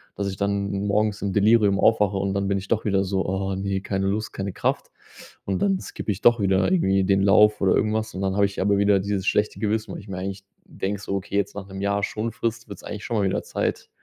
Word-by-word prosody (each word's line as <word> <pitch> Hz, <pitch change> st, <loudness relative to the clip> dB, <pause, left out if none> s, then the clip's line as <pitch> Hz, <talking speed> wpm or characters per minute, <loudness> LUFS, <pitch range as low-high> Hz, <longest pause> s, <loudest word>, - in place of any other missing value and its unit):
dass 100 Hz, -1 st, -2 dB
ich 95 Hz, -, -5 dB
dann 100 Hz, 0 st, -1 dB
morgens 105 Hz, 0 st, 0 dB
im 100 Hz, -, -1 dB
Delirium 105 Hz, -1 st, +4 dB
aufwache 105 Hz, -3 st, +3 dB
und 95 Hz, 0 st, -1 dB
dann 100 Hz, 0 st, -1 dB
bin 100 Hz, -, +1 dB
ich 95 Hz, -, -6 dB
doch 110 Hz, -1 st, +1 dB
wieder 95 Hz, -2 st, +2 dB
so: 95 Hz, 0 st, -1 dB
„Ah 95 Hz, 0 st, -2 dB
ne, 95 Hz, 0 st, -2 dB
keine 95 Hz, 0 st, -2 dB
Lust, 105 Hz, +2 st, -2 dB
keine 95 Hz, 0 st, -4 dB
Kraft.“ -, -, -2 dB, 0.5 s
Und 95 Hz, -2 st, -2 dB
dann 95 Hz, -2 st, +2 dB
skippe 105 Hz, +1 st, -5 dB
ich 95 Hz, -, -4 dB
doch 120 Hz, 0 st, +5 dB
wieder 95 Hz, 0 st, +2 dB
irgendwie 95 Hz, -, +2 dB
den 95 Hz, 0 st, +3 dB
Lauf 105 Hz, +2 st, +5 dB
oder 95 Hz, -2 st, +4 dB
irgendwas 110 Hz, 0 st, 0 dB
und 95 Hz, -, -4 dB
dann 95 Hz, 0 st, -1 dB
habe 100 Hz, -, +3 dB
ich 100 Hz, 0 st, -4 dB
aber 100 Hz, +1 st, +2 dB
wieder 100 Hz, -1 st, +3 dB
dieses 100 Hz, -1 st, -2 dB
schlechte 105 Hz, 0 st, +1 dB
Gewissen, 110 Hz, +1 st, -1 dB
weil -, -, -7 dB
ich 100 Hz, -, -15 dB
mir 95 Hz, -, -5 dB
eigentlich 95 Hz, +1 st, -5 dB, 0.2 s
denke 100 Hz, +1 st, -4 dB
so: 100 Hz, -, -3 dB
„Okay, 100 Hz, +1 st, -4 dB
jetzt 100 Hz, 0 st, -1 dB
nach 100 Hz, -1 st, -7 dB
'nem 95 Hz, 0 st, -8 dB
Jahr 100 Hz, 0 st, 0 dB
Schonfrist 115 Hz, +2 st, -3 dB
wird's 100 Hz, -, -9 dB
eigentlich 105 Hz, 0 st, -7 dB
schon 120 Hz, -, -3 dB
mal 100 Hz, -2 st, +2 dB
wieder -, -, -2 dB
Zeit, -, -, -3 dB
100 Hz, 250 wpm, -24 LUFS, 95-105 Hz, 0.5 s, doch